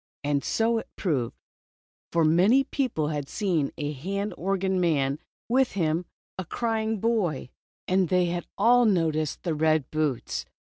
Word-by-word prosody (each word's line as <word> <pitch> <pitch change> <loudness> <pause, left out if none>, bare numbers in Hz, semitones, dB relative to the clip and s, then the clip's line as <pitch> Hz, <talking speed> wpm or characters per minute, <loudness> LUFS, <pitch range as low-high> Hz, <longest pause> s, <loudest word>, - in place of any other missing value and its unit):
And 145 -1 0
so 225 0 +1
it - - -9
proved. 135 - -1 0.8
For 165 -1 +3
many 190 +12 +5
people 245 - -1
had 145 -3 -3
seen 175 -9 0
a 145 -1 -2
hand 195 +9 -3
organ 190 +1 0
man, 145 -6 +2
and 140 - -5 0.3
with 260 +2 +2
him 165 -2 0 0.3
a - - -1
crying 220 +1 -1
boy, 190 - 0 0.4
and 185 -2 +2
they 180 -1 +3
had 175 0 -3
all 240 +4 +5
noticed 160 -7 +1
the 170 - -1
red 155 -2 +1
boots. 155 -5 -1
175 Hz, 150 wpm, -26 LUFS, 155-210 Hz, 0.8 s, many